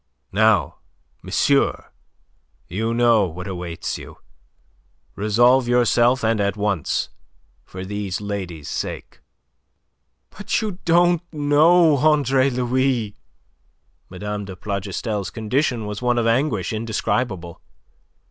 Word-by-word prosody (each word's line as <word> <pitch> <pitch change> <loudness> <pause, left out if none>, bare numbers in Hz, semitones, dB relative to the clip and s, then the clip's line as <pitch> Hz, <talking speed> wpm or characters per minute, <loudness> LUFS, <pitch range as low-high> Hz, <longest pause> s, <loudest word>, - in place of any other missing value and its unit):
Now, 110 +1 +2 0.4
monsieur, - - +1 0.8
you 110 +6 -2
know 115 -4 +3
what 90 +2 -8
awaits 90 -3 -5
you. - - -12 1.0
Resolve 120 +5 +3
yourself 120 0 +3
and 110 -1 +1
at 100 +1 -1
once, 100 -6 -1 0.6
for 95 0 -8
these 100 -2 -4
ladies' 95 -7 -5
sake." - - -5 1.2
"But - - -1
you 205 -4 -4
don't 175 0 +4
know, 155 +1 +4
Andre 140 -2 +3
Louis!" 125 -3 0 0.9
Mme. 105 +2 -5
de 95 -1 -8
Plougastel's 100 +2 -4
condition 120 +1 -1
was 105 +1 -5
one 120 -1 +1
of 120 - +1
anguish 115 - 0
indescribable. 110 -5 -2
110 Hz, 100 wpm, -21 LUFS, 100-130 Hz, 1.2 s, don't